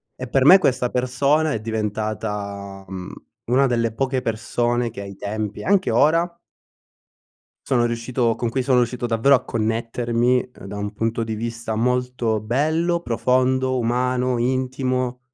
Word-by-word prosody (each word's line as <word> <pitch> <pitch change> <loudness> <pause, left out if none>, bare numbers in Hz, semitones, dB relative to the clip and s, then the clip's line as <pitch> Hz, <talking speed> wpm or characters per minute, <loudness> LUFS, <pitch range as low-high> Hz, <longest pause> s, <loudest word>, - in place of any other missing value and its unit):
E 130 - -6
per 135 +2 +2
me, 185 +6 +10
questa 130 -8 +1
persona 140 +5 +1
è - - -2
diventata, 105 -2 -4
uhm, 95 0 -7 0.3
una 130 +3 +3
delle 115 -2 0
poche 130 +2 -1
persone 120 +2 -1
che 110 - -10
ai 100 -1 -8
tempi, 105 +1 -4
anche 195 -1 +2
ora 170 +3 +2 1.3
sono 120 -2 +2
riuscito 120 0 0
con 120 - -2
cui 130 +2 -1
sono 125 -1 +3
uscito 120 +1 -2
davvero 120 +4 +4
a 125 - -2
connettermi, 115 +2 0
uhm, - - -9
da 100 +1 -6
un 105 0 -4
punto 115 +2 -1
di 110 -1 -3
vista 115 0 -4
molto 125 -1 0
bello, 160 +9 0
profondo, 130 0 +1
umano, 125 +1 0
intimo 130 0 -1
120 Hz, 145 wpm, -22 LUFS, 110-130 Hz, 1.3 s, me